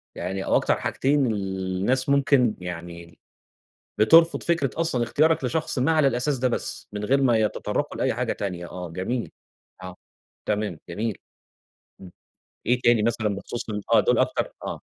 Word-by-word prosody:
يعني 95 +2 -4
أو - - +2
أكتر - - +2
حاجتين 140 +1 +1
الناس 95 +4 -1
ممكن 140 -5 +3
يعني 85 -1 -7
ال 85 -1 -18 0.8
بترفض 165 +10 +5
فكرة 165 -5 +1
أصلًا 160 -7 0
اختيارك 155 +6 +2
لشخص 155 +1 -1
ما 135 +6 +2
على 155 -3 +4
الأساس 135 +2 0
ده 130 +1 +1
بس، 110 -3 -3
من 105 0 -3
غير 135 +4 +2
ما 120 -4 +4
يتطرّقوا 110 -2 -1
لأي - - +1
حاجة - - -1
تانية 90 -3 -5
آه 90 -1 -6
جميل. 95 +8 -3 0.5
آه. 95 -1 -8 0.5
تمام، 105 -5 -2
جميل. 105 +4 -3 0.8
إمم. 90 -2 -11 0.6
إيه 125 +1 +2
تاني 120 -3 +4
مثلًا 110 -1 0
بخصوص 115 +3 -6
ال 105 -1 -3
آه. - - +7
دُول - - +2
أكتر - - 0
آه. - - -5
115 Hz, 160 wpm, -24 LUFS, 95-135 Hz, 0.8 s, آه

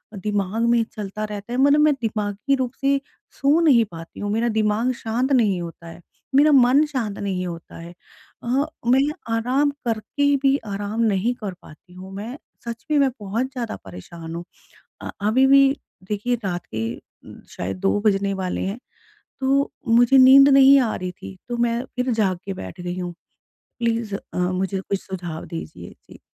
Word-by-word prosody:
दिमाग 205 +1 -2
में 235 -1 +4
चलता 210 0 -5
रहता 210 +2 -7
है - - -1
मतलब 285 +2 +5
मैं 300 0 +5
दिमागी 215 +4 -1
रूप 255 -2 -2
से 275 0 +2 0.3
सो 285 +4 +2
नहीं 260 -9 +5
पाती 165 0 -10
हूँ, 205 0 -2
मेरा 230 +3 +1
दिमाग 220 +2 +1
शांत 235 +4 -2
नहीं 210 -9 +3
होता 170 0 -9
है, 165 - -11 0.3
मेरा 295 +3 +6
मन 265 +1 +6
शांत 245 -9 -3
नहीं 190 -2 -2
होता 170 -1 -8
है। 170 +1 -10 0.5
अ, 260 +4 +1 0.2
मैं 265 +3 +4 0.3
आराम 260 +6 +1
करके 240 +6 0
भी 275 0 +4
आराम 205 +2 -3
नहीं 220 +1 +1
कर 195 -3 -3
पाती 165 +4 -16
हूँ, 185 +1 -10
मैं 225 +7 -6 0.3
सच 235 -1 -6
में 300 - +4
मैं 275 -1 +4
बहुत 215 +6 -2
ज़्यादा 240 -4 -4
परेशान 165 - -9
हूँ। 170 - -5 0.6
अ, - - -6 0.2
अभी 255 +5 +4
भी 275 0 +6 0.4
देखिए 210 +4 0
रात 175 -2 -3
के 115 +1 -3 0.6
शायद 90 - -4
2 195 +2 +1
बजने 200 -1 +2
वाले 185 -1 -2
हैं 200 +5 -4 0.6
तो 275 +1 +2 0.2
मुझे 240 +3 +5
नींद 270 +2 +8
नहीं 275 0 +7
आ 235 -4 0
रही 180 0 -5
थी 95 - -11
तो 240 - -2
मैं 235 0 +1
फिर 250 +1 0
जाग 195 -5 +1
के 195 - -3
बैठ 95 - -8
गई 175 +1 -4
हूँ। 180 -1 -4 0.7
प्लीज़ 230 -3 -1
अ, - - -11 0.2
मुझे 185 +2 -1
कुछ 195 0 -3
सुझाव 175 -4 -6
दीजिए? 80 -1 -8 0.2
जी। - - -13
220 Hz, 175 wpm, -22 LUFS, 190-255 Hz, 0.7 s, नींद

